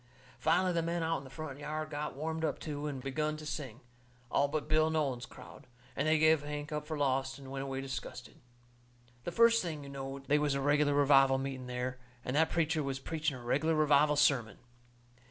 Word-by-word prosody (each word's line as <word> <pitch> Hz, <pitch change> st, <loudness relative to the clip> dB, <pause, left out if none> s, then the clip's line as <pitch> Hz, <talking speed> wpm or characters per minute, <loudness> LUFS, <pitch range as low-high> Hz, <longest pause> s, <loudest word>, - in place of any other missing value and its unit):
Finally 180 Hz, +3 st, +2 dB
the 170 Hz, -, +1 dB
men 170 Hz, 0 st, -1 dB
out 165 Hz, -1 st, 0 dB
in -, -, -12 dB
the 135 Hz, -, -11 dB
front 145 Hz, -1 st, -7 dB
yard 155 Hz, +1 st, -4 dB
got 145 Hz, -2 st, -4 dB
warmed 160 Hz, +3 st, -3 dB
up 160 Hz, -, 0 dB
too, 150 Hz, -1 st, -4 dB
and 135 Hz, -3 st, -5 dB
begun 150 Hz, +3 st, -1 dB
to 155 Hz, -, -9 dB
sing, 140 Hz, -5 st, -5 dB, 0.5 s
all 140 Hz, -, +3 dB
but 150 Hz, +1 st, -3 dB
Bill 155 Hz, 0 st, +3 dB
Nolan's 140 Hz, -6 st, -1 dB
crowd, -, -, -13 dB, 0.3 s
and 140 Hz, -, 0 dB
they 160 Hz, 0 st, +4 dB
give 155 Hz, -1 st, +5 dB
Hank 150 Hz, +1 st, -5 dB
up 150 Hz, 0 st, -3 dB
for 155 Hz, -, -3 dB
lost 135 Hz, -1 st, 0 dB
and 135 Hz, -1 st, -10 dB
went 135 Hz, 0 st, -3 dB
away 135 Hz, 0 st, -3 dB
disgusted. 135 Hz, -2 st, -7 dB, 0.8 s
The -, -, -2 dB
first 230 Hz, +4 st, +5 dB
thing 155 Hz, -5 st, -4 dB
you 140 Hz, -, -9 dB
knowed 135 Hz, 0 st, -6 dB
they 150 Hz, +2 st, +3 dB
was 145 Hz, -2 st, +1 dB
a -, -, 0 dB
reg'lar 145 Hz, +1 st, +3 dB
revival 135 Hz, -2 st, +5 dB
meeting 135 Hz, -1 st, -4 dB
there, 125 Hz, +1 st, -3 dB, 0.3 s
and 125 Hz, -, -2 dB
that 160 Hz, +2 st, +4 dB
preacher 160 Hz, -2 st, +1 dB
was 135 Hz, -2 st, -2 dB
preaching 155 Hz, 0 st, -2 dB
a 120 Hz, -, -11 dB
reg'lar 150 Hz, +7 st, +1 dB
revival 150 Hz, -1 st, +4 dB
sermon. 135 Hz, -6 st, +2 dB
145 Hz, 210 wpm, -32 LUFS, 135-155 Hz, 0.8 s, give